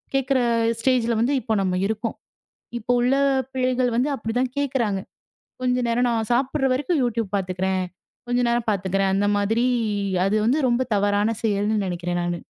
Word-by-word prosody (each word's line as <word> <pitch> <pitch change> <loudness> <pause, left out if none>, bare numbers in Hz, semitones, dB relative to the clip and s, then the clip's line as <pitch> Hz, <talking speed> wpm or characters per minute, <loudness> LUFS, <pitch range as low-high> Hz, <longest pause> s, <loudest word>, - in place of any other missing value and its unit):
கேக்குற 270 0 +2 0.4
ஸ்டேஜ்ல 235 -1 +2
வந்து 245 +5 +2
இப்ப 220 -2 -1
நம்ம 185 -1 0
இருக்கோம். 220 +1 -3 0.6
இப்ப 235 +2 -19
உள்ள 250 +2 +2 0.4
பிள்ளைகள் 255 -1 +1
வந்து 255 +5 +1
அப்டி 225 -2 -4
தான் 255 -1 0
கேக்குறாங்க. 250 -8 0 0.6
"கொஞ்ச 250 0 +1
நேரம் 245 +1 +2
நான் 225 -1 -1
சாப்பிடுற 270 +2 +1
வரைக்கும் 295 +4 0
YouTube 230 -4 -1
பாத்துக்கிறேன். 185 0 -1 0.4
கொஞ்ச 245 0 +1
நேரம் 235 -1 -1
பாத்துக்கிறேன்." 195 0 0
அந்த 205 +1 +1
மாதிரி 225 +4 +1 0.6
அது 210 +2 +1
வந்து 275 +6 +2
ரொம்ப 240 +2 +1
தவறான 205 +2 +1
செயல்னு 210 0 +1
நெனைக்கிறேன் 175 0 -2
நானு. 175 -1 -2
230 Hz, 155 wpm, -23 LUFS, 200-250 Hz, 0.6 s, கேக்குற